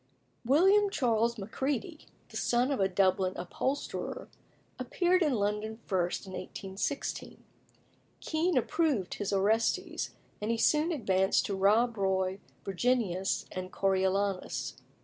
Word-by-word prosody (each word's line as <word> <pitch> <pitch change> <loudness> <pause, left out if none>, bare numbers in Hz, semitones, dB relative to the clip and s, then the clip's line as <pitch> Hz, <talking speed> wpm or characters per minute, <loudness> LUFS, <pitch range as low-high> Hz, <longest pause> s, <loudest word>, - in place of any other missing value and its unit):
William 385 - +5
Charles 235 - +1
Macready, 270 - -3 0.2
the - - -13
son 245 +3 +1
of 275 - 0
a 195 - +3
Dublin 185 0 +2
upholsterer, 270 - -3 0.5
appeared 355 +8 +1
in 300 -5 +3
London 210 +1 -1
first 180 -2 -1
in 190 - -9
1816. 190 +7 -4 0.8
Kean 330 0 0
approved 260 - +1
his 205 - -3
Orestes, 225 - 0 0.3
and 210 - -2
he 230 - +1
soon 305 +7 +3
advanced 190 - +2
to 200 - -2
Rob 220 +5 +3
Roy, 190 -1 0 0.3
Virginius, 195 -2 0
and 185 0 -5
Coriolanus. 195 0 0
220 Hz, 115 wpm, -30 LUFS, 190-280 Hz, 0.8 s, William